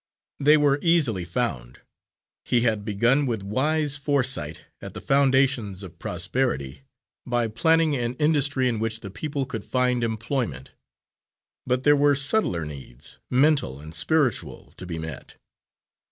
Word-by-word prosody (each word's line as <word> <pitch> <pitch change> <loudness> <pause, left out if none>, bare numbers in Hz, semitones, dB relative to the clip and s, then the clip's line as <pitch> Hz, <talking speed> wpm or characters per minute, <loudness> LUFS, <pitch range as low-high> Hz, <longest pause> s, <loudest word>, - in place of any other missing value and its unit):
They 150 +2 +5
were 145 -1 +2
easily 150 - +2
found. 80 - -3 0.6
He 120 - +2
had 110 -3 0
begun, 120 +7 +2
with 110 -5 -2
wise 145 +7 +1
foresight, 135 - -1 0.2
at - - -9
the - - -3
foundations 130 -8 +2
of 90 - -11
prosperity, 70 0 -2 0.4
by 120 -1 0
planning 160 +5 +2
an 120 -1 -2
industry 145 -3 +2
in 115 -3 -1
which 115 0 -2
the 100 - -8
people 140 +5 -3
could 135 - -6
find 125 -1 0
employment. 110 - -3 1.0
But 125 0 0
there 145 0 +6
were 145 0 +3
subtler 140 - +1
needs, 70 -3 -9
mental 135 - +2
and 75 +2 -11
spiritual, 130 - 0
to 90 - -8
be 85 -2 -5
met. 80 -3 -8
125 Hz, 140 wpm, -24 LUFS, 100-145 Hz, 1.0 s, there